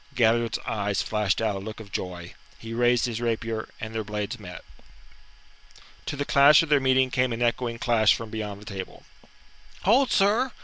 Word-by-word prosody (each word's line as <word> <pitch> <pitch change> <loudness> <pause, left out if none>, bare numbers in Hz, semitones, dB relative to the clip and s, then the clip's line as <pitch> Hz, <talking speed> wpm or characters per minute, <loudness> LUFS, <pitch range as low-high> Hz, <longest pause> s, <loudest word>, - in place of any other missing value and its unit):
Galliard's 115 -1 +2
eyes 100 -2 -1
flashed 105 0 0
out 105 -3 0
a - - -4
look 110 +3 -8
of 105 -3 -11
joy, 90 -2 -6 0.2
he 115 0 -8
raised 120 0 +2
his 120 -1 -4
rapier, 115 -1 -2
and 110 0 -6
their 110 -1 -2
blades 105 +3 -4
met. 90 -4 -10 1.4
To - - -3
the 145 0 -3
clash 140 +3 +6
of 165 - -6
their 145 -1 +4
meeting 130 -1 +2
came 130 -1 +1
an 115 +1 -2
echoing 120 0 -1
clash 115 -3 +3
from 115 -2 -8
beyond 105 -2 -5
the 105 - -14
table. 95 -3 -8 0.8
"Hold, 245 +6 +3
sir!" 220 +6 +2
115 Hz, 180 wpm, -25 LUFS, 105-130 Hz, 1.4 s, clash